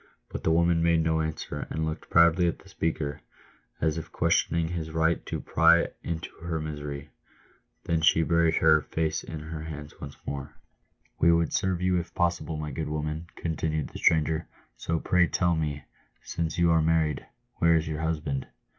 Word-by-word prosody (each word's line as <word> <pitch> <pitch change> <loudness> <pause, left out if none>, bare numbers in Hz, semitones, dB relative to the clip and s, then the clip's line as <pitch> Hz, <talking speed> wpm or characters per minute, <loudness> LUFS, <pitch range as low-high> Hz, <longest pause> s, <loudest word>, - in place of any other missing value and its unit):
But - - -6
the - - +2
woman 85 0 +3
made 85 -1 +3
no, 80 0 +1
answer, 75 -2 -4
and 80 0 -2
looked 80 0 -5
proudly 85 +1 +5
at 85 - -1
the - - -18
speaker, 75 -3 -2 0.6
as 80 0 +1
if 80 - -10
questioning 85 0 +1
his 85 -2 -4
right 80 +1 +1
to - - -3
pry 85 +1 +4
into 80 -1 -5
her 85 -1 -3
misery. 75 -1 -6 0.7
Then 85 -1 0
she 80 0 +5
buried 85 -1 +3
her 80 -1 +5
face 80 +2 -2
in 80 -2 -6
her 80 0 -6
hands 75 -2 -8
once 70 -1 -8
more. 70 0 -5 0.3
" - - -41
"We 85 - +6
would 85 -1 +2
serve 95 -1 0
you 90 -1 +3
if 85 0 -8
possible, 85 -2 0
my 75 -1 -4
good 75 +3 -3
woman," 75 +2 -3
continued 80 -2 -2
the - - -9
stranger; 80 0 +2 0.3
"so 80 0 -2
pray 90 +1 +3
tell 85 +1 +1
me, 75 -3 -2 0.4
since 80 -2 -3
you 85 -1 +4
are 80 -1 +4
married, 80 -3 +1 0.3
where 85 0 +5
is 80 0 +1
your 80 0 -3
husband 75 -4 -2
80 Hz, 180 wpm, -27 LUFS, 75-85 Hz, 0.7 s, We